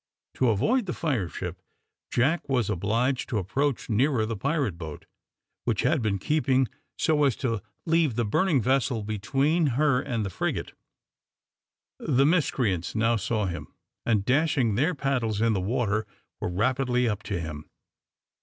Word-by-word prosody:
To 130 - +2
avoid 215 - +2
the 175 - -2
fire 125 - -1
ship, - - -6 0.5
Jack 145 +6 +1
was 125 -6 +1
obliged 115 +8 0
to 120 - -1
approach 130 +8 -1
nearer 120 +1 +2
the 115 +1 -3
pirate 140 - -1
boat, 80 -3 -8 0.6
which 115 -5 0
had 155 -4 +2
been 105 -3 0
keeping 135 +1 +2 0.3
so 155 -3 +2
as 135 -5 +3
to 115 -6 -2 0.2
leave 165 -7 +2
the 120 0 +1
burning 140 - +2
vessel 130 -3 +1
between 135 - +1
her 140 -4 +3
and 120 -6 -2
the 100 - -4
frigate. - - -2 1.3
The 135 +2 +2
miscreants 125 - +1
now 115 +1 +3
saw 110 0 -1
him, 85 -2 -4 0.4
and 105 -4 +1
dashing 135 -4 +2
their 150 - +1
paddles 125 -7 -1
in 115 0 +3
the 95 - 0
water, 110 0 0 0.3
were - - -2
rapidly 125 +5 +1
up 105 -3 -1
to 100 -4 -1
him. 75 -2 -7
120 Hz, 155 wpm, -27 LUFS, 105-140 Hz, 1.3 s, as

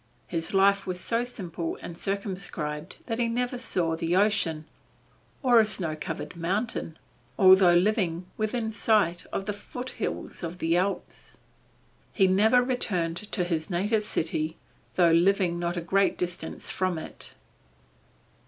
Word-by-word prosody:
His 165 -2 -3
life 195 0 +4
was 180 -1 -2
so 230 +5 0
simple 175 -8 -5
and 170 - -8
circumscribed 185 -5 -4
that 225 -1 -3
he 235 - +2
never 245 +2 -1
saw 170 -8 0
the 165 +1 -1
ocean, 185 -6 +2 0.8
or 245 -3 +6
a - - +7
snow 170 -7 -1
covered 155 - -6
mountain, 175 0 -2 0.4
although 185 -2 +7
living 180 -2 +1
within 220 +1 -1
sight 205 -5 +1
of 195 - -3
the 210 - -2
foothills 245 +5 -5
of 170 0 -5
the 165 -1 +1
Alps. 190 +3 -3 0.8
He 195 - +4
never 215 +6 +4
returned 185 -10 -1
to 205 -2 -1
his 165 -3 -2
native 205 +5 +1
city 160 -4 -1 0.4
though 175 -2 +5
living 175 0 +3
not 175 +1 -2
a - - -1
great 195 +4 +2
distance 180 0 -3
from 185 -2 0
it. 160 - -4
185 Hz, 140 wpm, -27 LUFS, 170-210 Hz, 0.8 s, a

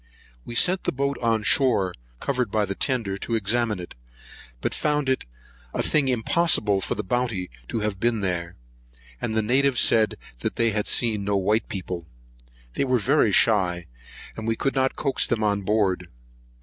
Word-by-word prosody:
We 120 - -7
sent 185 +9 +3
the - - +1
boat 140 +1 -2
on 115 -2 +1
shore, 105 -7 +3 0.3
covered 125 -4 -1
by 105 0 +1
the 100 - -3
tender, 105 -5 -1
to 115 - -2
examine 110 0 0
it; 90 - -8 0.7
but - - -2
found 150 -2 0
it 130 - 0 0.5
a - - 0
thing 150 -3 +2
impossible 120 - +2
for - - -2
the - - -3
Bounty 115 - -2 0.2
to 115 - -3
have 105 -2 -2
been 115 0 +1
there; 85 -3 -2 0.7
and 110 - -2
the 110 - +1
natives 130 +3 +2
said 110 -3 +4 0.4
they 115 -1 +2
had 105 0 -1
seen 110 -4 +2
no 100 0 0
white 105 +3 0
people. 90 -3 -5 0.7
They - - 0
were 130 -2 +2
very 125 -1 +2
shy, 90 -5 +2 0.5
and 110 0 -6
we 115 - +1
could 135 +4 -1
not 130 -1 +1
coax 135 -2 0
them 115 -3 -1
on 100 -1 +1
board. 95 -3 0
110 Hz, 175 wpm, -24 LUFS, 100-125 Hz, 0.7 s, said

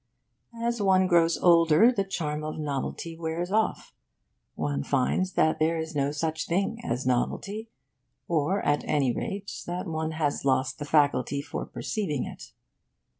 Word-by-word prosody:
As 235 -1 -1
one 190 -1 +4
grows 170 -2 +3
older, 170 +5 +6
the 200 -6 0
charm 155 -6 -3
of 155 0 -4
novelty 150 +2 -3
wears 165 +2 -3
off. 220 +1 0 0.6
One 70 -1 -1
finds 145 - 0
that 155 0 +2
there 160 +1 +2
is 160 0 -4
no 140 0 +1
such 155 +1 -2
thing 200 +6 -1
as 120 +2 -2
novelty 200 - -1 0.6
or, 170 +4 0
at 145 0 +2
any 135 -5 +1
rate, 200 - -4 0.2
that 180 +2 -3
one 160 -2 -2
has 150 -2 -1
lost 130 +1 +1
the 145 - -4
faculty 145 -2 +2
for 140 - -5
perceiving 165 - -2
it. - - -10
160 Hz, 150 wpm, -27 LUFS, 145-185 Hz, 0.6 s, older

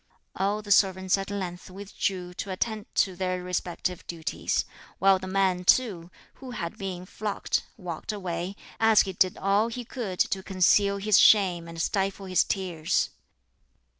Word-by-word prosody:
All 205 +2 -1
the 205 - -6
servants 190 -2 +4
at 195 - -5
length 185 -3 -5
withdrew 190 -2 -4
to 195 - -6
attend 215 +3 -2
to 190 -2 +2
their 185 0 -2
respective 180 0 -3
duties, 165 -2 -2 0.3
while 195 0 +4
the 185 - -7
man 185 -1 +1
too, 180 -5 +2 0.3
who 260 - -8
had 170 -2 -4
been 185 -2 -5
flogged, 205 +2 -2 0.2
walked 180 -1 -5
away, 185 -2 -4 0.2
as 225 -1 +6
he 190 - -3
did 185 0 +2
all 200 +3 +2
he 240 +1 -6
could 220 -7 -5
to 190 - +1
conceal 195 +2 +3
his 205 0 +4
shame 180 -5 +5
and 165 0 -8
stifle 195 +3 -1
his 185 -1 +3
tears. 175 -3 -1
190 Hz, 155 wpm, -27 LUFS, 180-200 Hz, 0.3 s, as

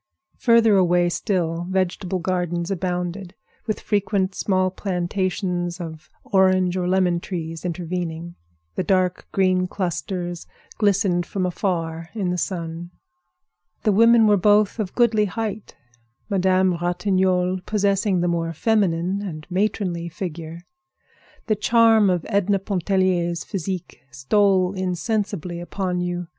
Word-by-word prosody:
Further 230 -4 +5
away 175 -1 +3
still, 175 -3 -1
vegetable 185 0 -1
gardens 175 0 -2
abounded, 180 0 -3 0.3
with 215 - -1
frequent 200 -2 0
small 185 -2 +1
plantations 180 -1 -2
of 160 -2 -8
orange 185 -2 +3
or 180 -1 -1
lemon 180 -2 +2
trees 165 -3 -5
intervening. 170 -1 -4 0.4
The - - -2
dark 185 -2 +1
green 185 -1 +2
clusters 175 -1 -4 0.3
glistened 195 -4 +2
from 190 -2 -2
afar 165 -3 -2
in 190 -5 -1
the 180 - -1
sun. 170 -1 -4 0.9
The 215 - +3
women 230 +2 +6
were 210 -1 +5
both 205 +3 +3
of 200 -4 -3
goodly 220 -3 +3
height, 215 +1 -5 0.6
Madame 185 -2 +2
Ratignolle 185 0 +1
possessing 200 -2 +1
the 175 - +1
more 165 -1 -1
feminine 190 -1 +1
and 155 -6 -6
matronly 180 -3 -1
figure. 170 -1 -7 0.8
The 215 - +1
charm 225 -1 +4
of 180 -3 0
Edna 200 0 +2
Pontellier's 185 -3 0
physique 190 -2 -5
stole 185 - +2
insensibly 185 -1 -2
upon 180 +1 -3
you. 175 0 -3
185 Hz, 120 wpm, -22 LUFS, 175-200 Hz, 0.9 s, women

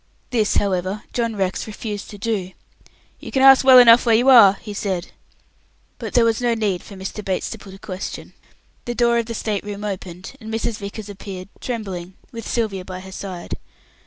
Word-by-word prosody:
This, 220 -4 +1
however, 195 +1 0
John 230 -2 -1
Rex 190 0 -2
refused 210 -1 -6
to 205 - -9
do. 200 -3 -2 0.7
"You - - -9
can 265 - +2
ask 270 0 +8
well 260 -1 +8
enough 240 -1 +8
where 230 -2 +4
you 245 +4 +4
are," 225 -7 +9
he 205 +1 -9
said. 190 -4 -3 0.9
But - - -6
there 240 -2 +5
was 225 +1 +1
no 240 -1 +2
need 205 -6 -1
for 200 - -12
Mr. 190 +2 -6
Bates 190 -2 -2
to 225 - -7
put 195 -2 -12
a - - -12
question. 190 -1 -7 0.5
The 240 - -3
door 235 0 +3
of 230 - -3
the 230 - -4
state 210 -2 -2
room 205 0 -6
opened, 190 +1 -6
and 220 0 -7
Mrs. 225 0 -2
Vickers 200 +1 -7
appeared, 195 -2 -8
trembling, 190 -7 -5 0.2
with 230 -1 -7
Sylvia 210 -6 -1
by 185 0 -7
her 190 0 -11
side. 185 -2 -6
210 Hz, 195 wpm, -21 LUFS, 190-230 Hz, 0.9 s, are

